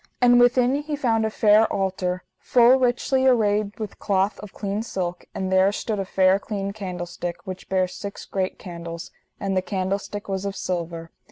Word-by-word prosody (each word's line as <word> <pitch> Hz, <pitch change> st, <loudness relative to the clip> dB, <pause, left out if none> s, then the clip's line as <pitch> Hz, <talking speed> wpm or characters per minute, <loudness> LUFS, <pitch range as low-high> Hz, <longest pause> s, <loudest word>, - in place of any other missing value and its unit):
And 245 Hz, 0 st, +6 dB
within 245 Hz, +1 st, +4 dB
he 295 Hz, +1 st, -3 dB
found 225 Hz, -6 st, +1 dB
a -, -, -2 dB
fair 215 Hz, 0 st, +4 dB
altar, 185 Hz, -1 st, -1 dB, 0.2 s
full 245 Hz, +2 st, +5 dB
richly 260 Hz, +1 st, +2 dB
arrayed 210 Hz, -4 st, +2 dB
with 215 Hz, -3 st, -6 dB
cloth 195 Hz, 0 st, +1 dB
of 210 Hz, -2 st, -9 dB
clean 200 Hz, +1 st, -3 dB
silk, 180 Hz, -6 st, -4 dB
and 190 Hz, 0 st, -2 dB
there 190 Hz, +1 st, +4 dB
stood 210 Hz, 0 st, -3 dB
a 195 Hz, -, -1 dB
fair 190 Hz, +1 st, +3 dB
clean 200 Hz, -1 st, -4 dB
candlestick, 175 Hz, -3 st, -5 dB
which 185 Hz, -1 st, -7 dB
bare 185 Hz, -1 st, +2 dB
six 200 Hz, +2 st, -7 dB
great 190 Hz, -1 st, -2 dB
candles, 170 Hz, -1 st, -8 dB, 0.3 s
and 195 Hz, -1 st, -1 dB
the 185 Hz, -, +2 dB
candlestick 195 Hz, +2 st, -3 dB
was 195 Hz, -1 st, -2 dB
of 200 Hz, -1 st, -3 dB
silver. 170 Hz, -3 st, -4 dB
195 Hz, 175 wpm, -24 LUFS, 185-220 Hz, 0.3 s, And